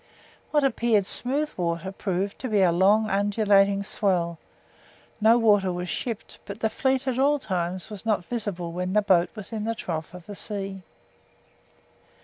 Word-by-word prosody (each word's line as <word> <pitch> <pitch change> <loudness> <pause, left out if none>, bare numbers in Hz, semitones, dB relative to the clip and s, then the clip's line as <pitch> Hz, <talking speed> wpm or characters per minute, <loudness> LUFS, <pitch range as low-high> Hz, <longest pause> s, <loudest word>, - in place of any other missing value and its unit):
What 295 -1 +2
appeared 230 -6 +2
smooth 285 +9 0
water 170 +1 -2
proved 195 0 -3
to 255 - -4
a 180 - +4
long 200 +5 +4
undulating 200 0 +3
swell; 175 -5 -1 0.8
no 225 +2 +6
water 205 -5 +3
was 180 0 -4
shipped, 230 -4 -5
but 200 +1 -7
the 220 -1 0
fleet 265 0 0
at 275 +3 +2
times 180 0 -3
was 205 -3 -7
not 215 -5 0
visible 200 -7 -4
when 180 +2 -3
the 210 0 +3
boat 180 -3 +3
was 215 +1 -8
in 215 -1 -3
the 230 0 -1
trough 165 -4 -5
of 180 -2 -11
the 205 - -8
sea. 195 -2 -4
200 Hz, 155 wpm, -25 LUFS, 180-225 Hz, 0.8 s, no